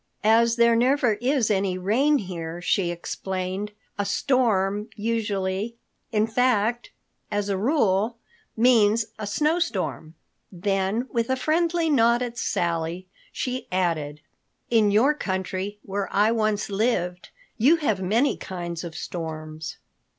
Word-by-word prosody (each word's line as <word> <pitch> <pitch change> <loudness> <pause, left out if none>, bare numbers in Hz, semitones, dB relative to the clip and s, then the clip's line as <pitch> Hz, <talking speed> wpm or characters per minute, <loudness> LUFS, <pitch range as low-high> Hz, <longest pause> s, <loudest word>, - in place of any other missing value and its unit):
"As 230 +2 +4
there 235 -1 +4
never 250 0 +3
is 255 -3 +2
any 190 -2 +1
rain 250 +11 +2
here," 170 -5 -5
she 175 0 +1
explained, 185 +3 -4 0.3
"a - - +2
storm 210 -2 +1
usually—in 210 0 -2
fact, 240 0 +1 0.4
as 205 -1 -1
a 200 - +1
rule—means 225 - +1
a 210 - -4
snow 305 +10 +1
storm." 160 - -3 0.4
Then 195 +5 -1
with 230 0 -1
a 260 - +2
friendly 330 +4 +1
nod 240 -4 +3
at 240 -1 -5
Sally, 170 +1 -1 0.3
she 255 0 -3
added, 160 -5 -1 0.5
"In 220 -3 +4
your 230 +9 +4
country, 190 -4 -3
where 195 0 -3
I 210 +3 +3
once 215 -2 0
lived, 195 -4 -1 0.3
you 275 +9 +6
have 220 - -1
many 225 +9 +2
kinds 175 -2 -5
of 170 -2 -7
storms." 155 -2 -6
210 Hz, 120 wpm, -25 LUFS, 185-235 Hz, 0.5 s, you